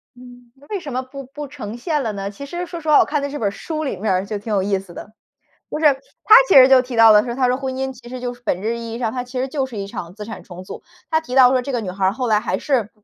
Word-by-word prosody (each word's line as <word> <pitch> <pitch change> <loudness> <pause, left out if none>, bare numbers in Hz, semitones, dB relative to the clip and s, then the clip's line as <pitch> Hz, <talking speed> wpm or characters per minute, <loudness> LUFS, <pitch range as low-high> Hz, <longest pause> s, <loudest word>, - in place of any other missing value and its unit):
嗯， 245 -1 -15
那 280 +2 -21
为 410 - -3
什 285 -7 -7
么 255 - -1
不 275 +2 -9
不 290 +3 -8
呈 215 -5 -7
现 295 +3 -1
了 225 - -2
呢？ 200 0 -4
其 205 +8 -9
实 345 +5 -5
说 340 0 -7
实 315 - -11
话， 300 - +6
我 - - +5
看 295 0 -1
的 285 - -3
这 290 - -5
本 215 - 0
儿 - - -1
书 310 +9 -5
里 270 -9 -3
面 200 +1 0
儿 185 +1 0
就 210 0 -3
挺 210 +2 -5
有 200 - +2
意 195 +1 0
思 190 -2 -10
的， 205 - -10 0.6
就 - - -3
是， 315 - 0 0.4
它 435 - +9
其 - - +5
实 260 -1 +10
就 265 -1 +6
提 250 -2 -7
到 225 -1 +8
了 210 0 +6
说， 240 - -4
它 255 0 +1
说 250 - +2
婚 265 0 -4
姻 265 0 -3
其 240 -1 -14
实 255 0 -6
就 245 0 -4
是 245 - -19
本 180 -5 -1
质 225 +3 -2
意 230 -1 -7
义 235 - -5
上， 225 -3 -1
它 250 -1 -3
其 250 +1 -6
实 260 - -1
就 270 0 -2
是 250 -4 -9
一 200 -1 -4
场 170 -3 -7
资 210 +1 -8
产 225 - -8
重 180 0 -11
组。 - - -9 0.3
它 315 0 +2
提 310 -6 -8
到 255 -1 +7
说 260 -1 +2
这 275 - -5
个 245 - -1
女 205 -5 -5
孩 190 +1 -5
儿， - - +3
后 250 +2 -3
来 215 -2 +3
还 185 - -2
是 250 -8 0
245 Hz, 365 characters per minute, -20 LUFS, 210-270 Hz, 0.6 s, 实